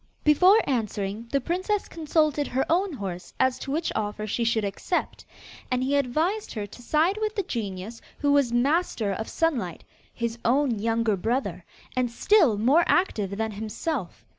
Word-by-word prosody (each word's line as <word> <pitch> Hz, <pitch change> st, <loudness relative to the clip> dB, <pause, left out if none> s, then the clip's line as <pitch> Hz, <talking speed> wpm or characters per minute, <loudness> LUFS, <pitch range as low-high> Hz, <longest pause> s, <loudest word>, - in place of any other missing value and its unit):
Before 365 Hz, +8 st, +6 dB
answering, 215 Hz, -3 st, -2 dB
the 275 Hz, -, +2 dB
princess 370 Hz, -, -1 dB
consulted 305 Hz, -2 st, +1 dB
her 265 Hz, +1 st, 0 dB
own 370 Hz, +3 st, +2 dB
horse 190 Hz, -8 st, -6 dB
as 260 Hz, -1 st, +2 dB
to 270 Hz, -, -5 dB
which 320 Hz, +3 st, -1 dB
offer 210 Hz, 0 st, -2 dB
she 225 Hz, +3 st, -1 dB
should 225 Hz, -2 st, +1 dB
accept, 200 Hz, -, -2 dB, 0.5 s
and 255 Hz, -1 st, 0 dB
he 275 Hz, +2 st, +1 dB
advised 310 Hz, -, 0 dB
her 210 Hz, -2 st, -3 dB
to 205 Hz, +4 st, -13 dB
side 320 Hz, -, +1 dB
with 430 Hz, 0 st, -1 dB
the 400 Hz, -, 0 dB
genius 215 Hz, -, -5 dB, 0.2 s
who 285 Hz, -1 st, +1 dB
was 280 Hz, -4 st, +3 dB
master 245 Hz, -, +1 dB
of 220 Hz, +3 st, -5 dB
Sunlight, 245 Hz, -, -1 dB, 0.3 s
his 235 Hz, 0 st, -3 dB
own 250 Hz, -2 st, +2 dB
younger 225 Hz, 0 st, +1 dB
brother, 235 Hz, +8 st, -2 dB, 0.3 s
and 250 Hz, -1 st, +1 dB
still 270 Hz, -, +3 dB
more 270 Hz, +11 st, +4 dB
active 205 Hz, -, +1 dB
than 220 Hz, 0 st, -1 dB
himself. 215 Hz, -, -4 dB
250 Hz, 165 wpm, -26 LUFS, 220-315 Hz, 0.5 s, Before